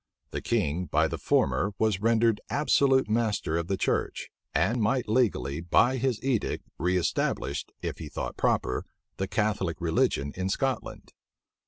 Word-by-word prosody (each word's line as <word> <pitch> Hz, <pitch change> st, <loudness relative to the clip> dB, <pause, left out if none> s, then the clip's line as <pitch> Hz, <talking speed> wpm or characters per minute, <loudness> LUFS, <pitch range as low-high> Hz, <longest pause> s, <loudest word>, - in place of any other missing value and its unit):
The -, -, -3 dB
king 80 Hz, +5 st, 0 dB
by 75 Hz, -, +2 dB
the -, -, -5 dB
former 70 Hz, +10 st, +1 dB
was 110 Hz, -3 st, +1 dB
rendered 115 Hz, -1 st, +3 dB
absolute 140 Hz, -3 st, +3 dB
master 105 Hz, -7 st, 0 dB
of 85 Hz, 0 st, -1 dB
the 95 Hz, 0 st, -1 dB
church, -, -, -1 dB, 0.2 s
and 120 Hz, +1 st, +1 dB
might 125 Hz, +4 st, +1 dB
legally, 105 Hz, -, +1 dB
by 115 Hz, +10 st, +3 dB
his 125 Hz, -2 st, 0 dB
edict, 130 Hz, -5 st, -1 dB
reëstablish, 90 Hz, -5 st, 0 dB, 0.2 s
if -, -, -4 dB
he -, -, -6 dB
thought -, -, -4 dB
proper, 65 Hz, -, 0 dB, 0.3 s
the 95 Hz, -, -2 dB
Catholic 100 Hz, -5 st, -1 dB
religion 80 Hz, -4 st, +1 dB
in 95 Hz, +1 st, -2 dB
Scotland. 130 Hz, +3 st, -2 dB
105 Hz, 145 wpm, -28 LUFS, 85-120 Hz, 0.3 s, rendered